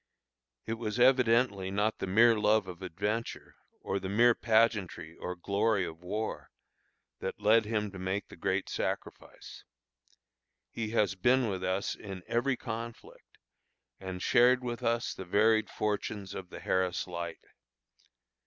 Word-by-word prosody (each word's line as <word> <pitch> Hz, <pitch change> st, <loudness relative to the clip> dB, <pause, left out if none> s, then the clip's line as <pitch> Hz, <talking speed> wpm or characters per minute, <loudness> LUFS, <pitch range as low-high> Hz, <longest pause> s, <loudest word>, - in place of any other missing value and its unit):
It 115 Hz, 0 st, -4 dB
was 110 Hz, 0 st, -3 dB
evidently 120 Hz, -6 st, +4 dB
not 105 Hz, +3 st, 0 dB
the -, -, -3 dB
mere 115 Hz, +5 st, +5 dB
love 105 Hz, -1 st, +2 dB
of 90 Hz, 0 st, -9 dB
adventure, 105 Hz, +6 st, -3 dB, 0.3 s
or 100 Hz, -, -2 dB
the 95 Hz, 0 st, -5 dB
mere 120 Hz, +4 st, +5 dB
pageantry 110 Hz, -8 st, +1 dB
or 90 Hz, -, -5 dB
glory 100 Hz, +2 st, +1 dB
of 80 Hz, 0 st, -8 dB
war, 105 Hz, +5 st, -4 dB, 0.7 s
that -, -, -5 dB
led 110 Hz, +2 st, +4 dB
him 105 Hz, -2 st, -1 dB
to 95 Hz, -, -9 dB
make 95 Hz, +2 st, -2 dB
the -, -, -12 dB
great 95 Hz, +3 st, -1 dB
sacrifice. -, -, -5 dB, 1.1 s
He 110 Hz, -2 st, -3 dB
has 105 Hz, -3 st, +2 dB
been 120 Hz, +5 st, +2 dB
with 95 Hz, -2 st, -3 dB
us 95 Hz, +2 st, -1 dB
in 95 Hz, -3 st, -8 dB
every 125 Hz, +2 st, 0 dB
conflict, 115 Hz, 0 st, -8 dB, 0.6 s
and 95 Hz, -1 st, -6 dB
shared 125 Hz, +1 st, +4 dB
with 120 Hz, -1 st, -4 dB
us 115 Hz, +2 st, 0 dB
the -, -, -7 dB
varied 110 Hz, +4 st, +3 dB
fortunes 105 Hz, -2 st, -3 dB
of 95 Hz, -2 st, -7 dB
the -, -, -9 dB
Harris 95 Hz, -1 st, 0 dB
Light. 85 Hz, -2 st, -6 dB
105 Hz, 145 wpm, -30 LUFS, 95-115 Hz, 1.1 s, mere